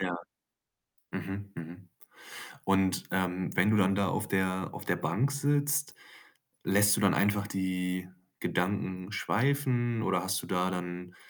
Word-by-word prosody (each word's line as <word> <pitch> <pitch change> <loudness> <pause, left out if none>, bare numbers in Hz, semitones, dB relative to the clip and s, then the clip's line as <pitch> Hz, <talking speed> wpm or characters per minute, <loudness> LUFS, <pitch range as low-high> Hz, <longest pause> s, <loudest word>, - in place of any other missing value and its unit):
Ja. 90 -2 -1 1.0
Mhm, 100 +1 -5
mhm. 85 +3 -9 0.8
Und, 95 -1 +2
ähm, 95 0 -1
wenn 95 +4 +4
du 110 - +4
dann 95 -1 +4
da 100 -1 +2
auf 105 +2 -1
der 95 -2 0
auf - - -8
der - - +1
Bank 135 +7 0
sitzt, 145 +1 +1 0.7
lässt 100 +1 +5
du - - 0
dann 100 - +5
einfach 100 0 +2
die 90 -1 -2 0.3
Gedanken 95 0 -1
schweifen 120 0 +1
oder 90 - +1
hast 95 0 0
du - - -8
da 90 0 +1
dann, 90 0 -5
95 Hz, 145 wpm, -30 LUFS, 90-105 Hz, 1.0 s, lässt